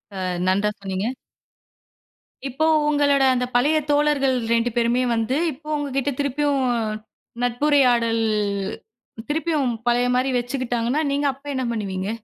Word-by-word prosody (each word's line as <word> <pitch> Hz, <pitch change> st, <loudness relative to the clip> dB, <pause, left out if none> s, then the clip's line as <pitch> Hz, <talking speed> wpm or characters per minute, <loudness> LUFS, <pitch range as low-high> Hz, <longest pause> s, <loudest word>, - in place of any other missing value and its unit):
அ -, -, -6 dB, 0.3 s
நன்றா 200 Hz, +3 st, +2 dB
சொன்னீங்க. 195 Hz, +1 st, -3 dB, 1.4 s
இப்போ. 300 Hz, +5 st, -1 dB, 0.2 s
உங்களோட 285 Hz, -2 st, +3 dB
அந்த 250 Hz, 0 st, 0 dB
பழைய 290 Hz, +6 st, +3 dB
தோழர்கள் 290 Hz, -2 st, +2 dB, 0.2 s
2 230 Hz, +1 st, +2 dB
பேருமே 240 Hz, +1 st, +2 dB
வந்து 225 Hz, +3 st, 0 dB, 0.2 s
இப்போ 300 Hz, +2 st, -14 dB
உங்ககிட்ட 280 Hz, -1 st, -2 dB
திருப்பியும் 285 Hz, 0 st, 0 dB, 0.8 s
நட்புரையாடல் 245 Hz, -3 st, +2 dB, 1.1 s
திருப்பியும் 305 Hz, -3 st, 0 dB, 0.2 s
பழைய 245 Hz, +1 st, +3 dB
மாரி 255 Hz, +2 st, +1 dB
வச்சுக்கிட்டாங்கன்னா, 245 Hz, +1 st, -1 dB
நீங்க 285 Hz, +1 st, 0 dB
அப்ப 275 Hz, +2 st, -23 dB
என்ன 260 Hz, -1 st, -2 dB
பண்ணுவீங்க? 195 Hz, -3 st, -3 dB
255 Hz, 115 wpm, -22 LUFS, 235-285 Hz, 1.4 s, உங்களோட